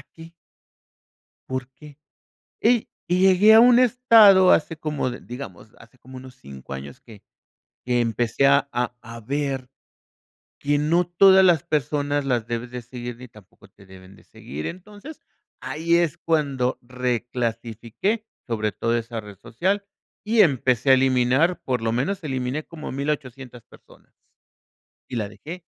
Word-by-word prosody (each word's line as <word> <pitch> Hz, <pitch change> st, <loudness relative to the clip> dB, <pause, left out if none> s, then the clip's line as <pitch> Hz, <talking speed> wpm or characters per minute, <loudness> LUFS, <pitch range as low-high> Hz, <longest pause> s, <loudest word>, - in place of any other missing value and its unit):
¿para -, -, -14 dB
qué? 165 Hz, 0 st, -13 dB, 1.2 s
¿Por 130 Hz, 0 st, -4 dB
qué? 150 Hz, -2 st, -15 dB, 0.6 s
Y 235 Hz, 0 st, +2 dB, 0.2 s
y 180 Hz, +1 st, 0 dB
llegué 190 Hz, +3 st, +5 dB
a 220 Hz, -, +8 dB
un 245 Hz, +1 st, +6 dB
estado 225 Hz, -7 st, +6 dB
hace 160 Hz, 0 st, +1 dB
como 150 Hz, -4 st, -3 dB
de 125 Hz, -, -7 dB
digamos, 115 Hz, -5 st, -10 dB
hace 115 Hz, +2 st, -19 dB
como 130 Hz, 0 st, -14 dB
unos 130 Hz, 0 st, -12 dB
5, 70 Hz, -, -11 dB
años, 70 Hz, -, -9 dB
que 110 Hz, -5 st, -15 dB, 0.6 s
que 125 Hz, -1 st, 0 dB
empecé 120 Hz, +3 st, 0 dB
a 140 Hz, 0 st, +3 dB
a 125 Hz, 0 st, -2 dB
a 115 Hz, +1 st, -10 dB
ver 135 Hz, +1 st, -3 dB, 0.9 s
que 145 Hz, +1 st, 0 dB
no 165 Hz, +4 st, +1 dB
todas 190 Hz, +2 st, +5 dB
las 175 Hz, -3 st, +3 dB
personas 145 Hz, -2 st, -1 dB
las 120 Hz, -4 st, -1 dB
debes 120 Hz, +1 st, -5 dB
de 125 Hz, -1 st, -6 dB
seguir, 120 Hz, 0 st, -8 dB
ni 125 Hz, +1 st, -11 dB
tampoco 100 Hz, -3 st, -19 dB
te 100 Hz, +1 st, -21 dB
deben 95 Hz, 0 st, -15 dB
de -, -, -21 dB
seguir. 75 Hz, +3 st, -9 dB
Entonces, 205 Hz, -, -10 dB, 0.4 s
ahí 165 Hz, +2 st, -1 dB
es 170 Hz, -3 st, +1 dB
cuando 140 Hz, -6 st, -1 dB
reclasifiqué, 120 Hz, -, -3 dB, 0.2 s
sobre 110 Hz, -3 st, -2 dB
todo 115 Hz, +4 st, -1 dB
esa 115 Hz, 0 st, -5 dB
red 105 Hz, -2 st, -11 dB
social, 190 Hz, -, -2 dB, 0.4 s
y 220 Hz, +1 st, +3 dB
empecé 130 Hz, -, +2 dB
a -, -, +8 dB
eliminar, 130 Hz, +6 st, +2 dB
por 125 Hz, -3 st, -2 dB
lo 115 Hz, -, -1 dB
menos 170 Hz, -, -2 dB
eliminé 130 Hz, +1 st, -3 dB
como 165 Hz, -3 st, -9 dB
1800, 135 Hz, -3 st, -5 dB
personas -, -, -21 dB, 0.9 s
y 125 Hz, -, -4 dB
la 105 Hz, -3 st, -3 dB
dejé. 165 Hz, -, -10 dB
130 Hz, 150 wpm, -23 LUFS, 120-165 Hz, 1.2 s, a